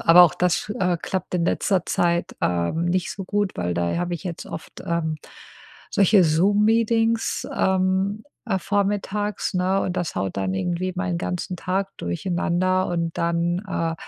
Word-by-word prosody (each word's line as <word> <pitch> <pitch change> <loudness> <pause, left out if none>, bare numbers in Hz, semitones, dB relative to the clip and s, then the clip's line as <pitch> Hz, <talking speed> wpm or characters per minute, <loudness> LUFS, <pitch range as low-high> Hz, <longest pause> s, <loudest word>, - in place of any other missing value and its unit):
Aber 170 +2 +8
auch 165 - +1
das, 180 +3 0
äh, 180 -3 +1
klappt 185 -1 -3
in 170 -1 +1
letzter 190 -2 +1
Zeit, 170 0 0
ähm, 90 - 0
nicht 175 0 0
so 195 - -6
gut, 205 0 0
weil 90 0 -1
da 85 0 0
habe 175 0 -2
ich 170 - -4
jetzt 175 -4 -5
oft, 160 - -9
ähm, 165 -2 -1 0.7
solche 200 0 +5
Zoom-Meetings, 220 +7 +2
ähm, 190 +2 +1 0.2
äh, 195 -5 +1
vormittags, 205 +1 -1
ne? 185 +2 +2
Und 185 - -2
das 175 -2 -2
haut 95 -1 -2
dann 95 -1 -1
irgendwie 175 - -1
meinen 180 -2 -1
ganzen 180 +1 -3
Tag 190 +3 -2
durcheinander 180 - 0
und 170 -1 -2
dann, 170 +1 0
äh, 165 -4 -1
180 Hz, 160 wpm, -23 LUFS, 170-195 Hz, 0.7 s, Aber